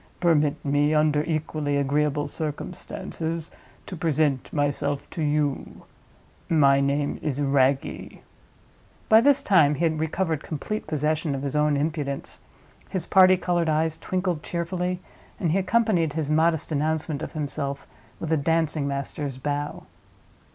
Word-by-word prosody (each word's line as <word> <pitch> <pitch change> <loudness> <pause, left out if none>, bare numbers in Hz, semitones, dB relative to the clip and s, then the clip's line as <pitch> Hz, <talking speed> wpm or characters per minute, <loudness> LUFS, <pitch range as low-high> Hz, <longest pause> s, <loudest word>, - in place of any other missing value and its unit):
Permit 155 -4 +2
me, 145 +2 +2
under 150 -1 +3
equally 155 -3 -1
agreeable 145 +1 +1
circumstances, 160 +2 -5 0.3
to 185 - -7
present 155 -5 0
myself 145 -1 -1
to 165 - -4
you. 145 -2 -1 0.7
My 140 -4 +5
name 140 +1 0
is 145 -2 -2
Wragge." 135 -1 +1 0.9
By 220 +1 +8
this 280 +2 +4
time 160 -7 +4
he 155 - -2
had 160 -1 0
recovered 160 0 -1
complete 170 +9 -4
possession 155 0 0
of 135 - -5
his 140 0 -3
own 150 -1 +2
impudence; 145 -2 -2 0.5
his 185 - -3
party 185 -1 +6
colored 175 -2 0
eyes 155 +1 +1
twinkled 180 -4 -2
cheerfully, 180 +2 -3 0.4
and 170 - 0
he 190 - +2
accompanied 190 -6 +2
his 155 -1 -2
modest 160 0 +2
announcement 155 0 -1
of - - -6
himself 140 -2 -4 0.3
with 165 - -4
a 160 - +4
dancing 155 -1 +1
master's 140 0 -4
bow. 145 +2 -3
155 Hz, 135 wpm, -25 LUFS, 145-165 Hz, 0.9 s, By